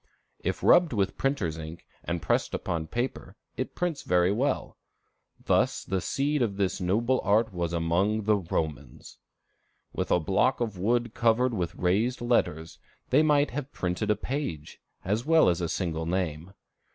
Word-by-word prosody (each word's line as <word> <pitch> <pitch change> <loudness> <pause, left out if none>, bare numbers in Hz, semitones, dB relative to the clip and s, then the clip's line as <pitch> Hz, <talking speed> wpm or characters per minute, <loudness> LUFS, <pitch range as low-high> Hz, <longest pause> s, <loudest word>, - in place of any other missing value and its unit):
If - - -3
rubbed 175 -5 +5
with 100 -3 0
printer's 95 - -1
ink 80 +1 -9 0.2
and 85 -1 -3
pressed - - 0
upon 80 -2 -3
paper, 120 +7 -4 0.2
it - - -4
prints 175 -4 -2
very 90 +1 +2
well. 130 +8 -1 0.7
Thus - - +2
the 95 0 -2
seed 145 - 0
of 105 -5 0
this 95 -1 -1
noble 115 +8 +1
art 105 +2 +2
was 85 -2 -2
among 85 +6 +1
the 105 0 +3
Romans. 80 -5 -5 0.7
With - - -2
a 90 - +4
block 100 - +1
of 110 -6 -3
wood 120 +3 0
covered 120 +2 +2
with 90 -4 -2
raised 105 +8 +1
letters, 85 -10 0 0.3
they 140 +4 +6
might 150 -2 +3
have 145 +1 -5
printed 90 +4 -2
a 105 - +4
page, 105 - -5 0.2
as 105 +5 0
well 160 - +5
as 85 0 0
a 85 - -1
single 80 -3 -2
name. 85 -1 -2
100 Hz, 160 wpm, -27 LUFS, 85-120 Hz, 0.7 s, they